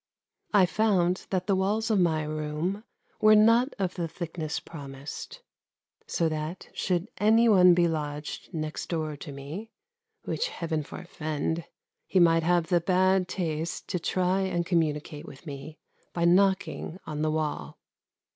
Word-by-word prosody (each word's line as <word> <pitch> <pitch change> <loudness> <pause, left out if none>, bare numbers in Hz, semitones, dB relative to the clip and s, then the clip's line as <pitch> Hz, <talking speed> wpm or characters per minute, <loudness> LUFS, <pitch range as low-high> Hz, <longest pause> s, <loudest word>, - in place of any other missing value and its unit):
I 200 -3 +6
found 185 -2 +1
that 185 -2 -1
the 200 - +2
walls 210 +4 0
of 210 - +3
my 160 -3 +2
room 155 +7 -3 0.3
were 215 0 +7
not 230 +5 +5
of 185 -3 -1
the 170 -3 -3
thickness 160 -1 -4
promised, 145 - -9 0.6
so 165 - +1
that, 155 +2 -4
should 180 +1 -1
any 225 +3 +5
one 180 -5 +7
be 175 -1 +4
lodged 150 -2 -4
next 155 -3 -4
door 155 -3 -2
to 145 - -8
me, 145 +11 -7 0.5
which - - -1
Heaven 165 - -3
forfend! 160 +1 -4 0.4
he 190 - +2
might 165 -1 +5
have 170 0 +2
the 175 -1 +3
bad 185 +1 +3
taste 165 -3 -3
to 180 - -1
try 185 +2 +1
and 175 -3 -1
communicate 155 -4 -1
with 140 +4 -12
me 145 +1 -8 0.4
by 170 -1 0
knocking 190 -1 +2
on 150 -1 -4
the 155 - +1
wall. 155 - -2
170 Hz, 145 wpm, -28 LUFS, 155-190 Hz, 0.6 s, were